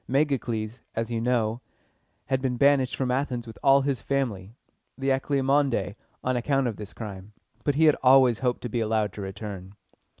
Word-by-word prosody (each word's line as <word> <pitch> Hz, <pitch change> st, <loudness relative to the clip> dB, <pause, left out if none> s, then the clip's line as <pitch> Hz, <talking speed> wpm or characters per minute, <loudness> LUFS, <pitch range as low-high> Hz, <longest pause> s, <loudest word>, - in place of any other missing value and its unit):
Megacles, 125 Hz, -5 st, -1 dB
as 115 Hz, +1 st, -2 dB
you 115 Hz, -1 st, -1 dB
know, 115 Hz, -1 st, 0 dB, 0.6 s
had 130 Hz, -1 st, 0 dB
been 130 Hz, -2 st, -1 dB
banished 140 Hz, -1 st, +3 dB
from 130 Hz, -2 st, -1 dB
Athens 125 Hz, -2 st, -1 dB
with 115 Hz, -, -11 dB
all 135 Hz, 0 st, +5 dB
his 135 Hz, -5 st, -1 dB
family 115 Hz, -7 st, -2 dB, 0.4 s
(the 135 Hz, 0 st, -1 dB
Alcmæonidæ) 135 Hz, -6 st, +1 dB, 0.3 s
on 130 Hz, 0 st, 0 dB
account 135 Hz, +2 st, +1 dB
of 115 Hz, -4 st, -2 dB
this 105 Hz, -1 st, -8 dB
crime, 100 Hz, -2 st, -8 dB, 0.3 s
but 145 Hz, -, +1 dB
he 160 Hz, +2 st, +4 dB
had 150 Hz, -, +6 dB
always 130 Hz, -3 st, +5 dB
hoped 125 Hz, -2 st, -1 dB
to -, -, -4 dB
be 120 Hz, -, -1 dB
allowed 110 Hz, -2 st, 0 dB
to 105 Hz, -, -7 dB
return. 95 Hz, -1 st, -7 dB
125 Hz, 175 wpm, -26 LUFS, 110-135 Hz, 0.6 s, had